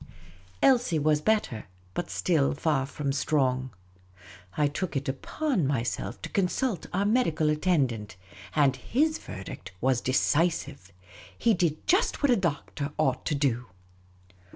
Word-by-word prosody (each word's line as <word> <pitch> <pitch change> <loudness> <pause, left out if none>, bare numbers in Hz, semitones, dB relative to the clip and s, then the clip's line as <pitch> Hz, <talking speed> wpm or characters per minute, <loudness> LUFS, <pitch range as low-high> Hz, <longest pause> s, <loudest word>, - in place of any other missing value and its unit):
Elsie 245 -10 +4
was 150 0 +2
better, 210 - 0 0.3
but 175 - -3
still 150 -6 +1
far 140 -3 0
from 140 0 -3
strong. 130 -3 +1 0.9
I 150 - +3
took 160 +3 -4
it 135 0 -2
upon 180 - -1
me 135 -5 0
to - - -4
consult 200 +1 0
our 195 +3 0
medical 185 -9 +2
attendant; 135 - 0 0.4
and 140 -3 +4
his 310 - 0
verdict 95 0 -8
Wiis 130 +1 +1
decisive. 145 - 0 0.5
He 230 - +3
did 170 -4 0
just 385 -2 +2
what 285 - +5
a - - +6
doctor 150 -5 -2
ought 135 -4 0
to 150 - +1
do. 125 -4 0
150 Hz, 130 wpm, -28 LUFS, 135-185 Hz, 0.9 s, a